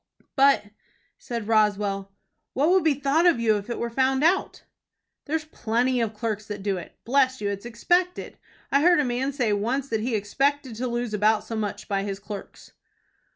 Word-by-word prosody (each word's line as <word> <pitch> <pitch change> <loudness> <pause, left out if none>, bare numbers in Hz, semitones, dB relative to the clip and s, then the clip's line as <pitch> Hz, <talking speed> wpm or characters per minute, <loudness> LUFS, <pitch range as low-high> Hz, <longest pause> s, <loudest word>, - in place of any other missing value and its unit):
"But," 275 -3 +5 0.6
said 230 -3 -5
Roswell, 205 -3 +1 0.4
"what 295 +6 +2
would 375 0 +4
be 315 -3 +3
thought 285 +5 +2
of 335 -8 +4
you 220 -2 +3
if 205 +3 -8
it 235 - -3
were 235 0 -3
found 265 +3 +1
out?" 355 +4 +1 0.6
"There's 310 +1 -2
plenty 245 -3 0
of 220 -2 -2
clerks 215 -1 -3
that 205 -2 -6
do 195 -2 0
it. 175 - -10
Bless 260 +1 +2
you, 205 -1 -2
it's 200 +3 -5
expected. 350 +10 0 0.3
I 280 - +4
heard 345 +1 +5
a 295 - +2
man 250 +3 -1
say 245 -6 0
once 250 +7 -1
that 220 -1 -1
he 235 +1 -1
expected 270 +6 0
to 250 +2 -2
lose 240 -2 -3
about 210 +1 +2
so 225 - -6
much 215 -2 -4
by 195 -2 0
his 195 -1 -4
clerks." 205 -1 -9
235 Hz, 190 wpm, -25 LUFS, 210-275 Hz, 0.6 s, But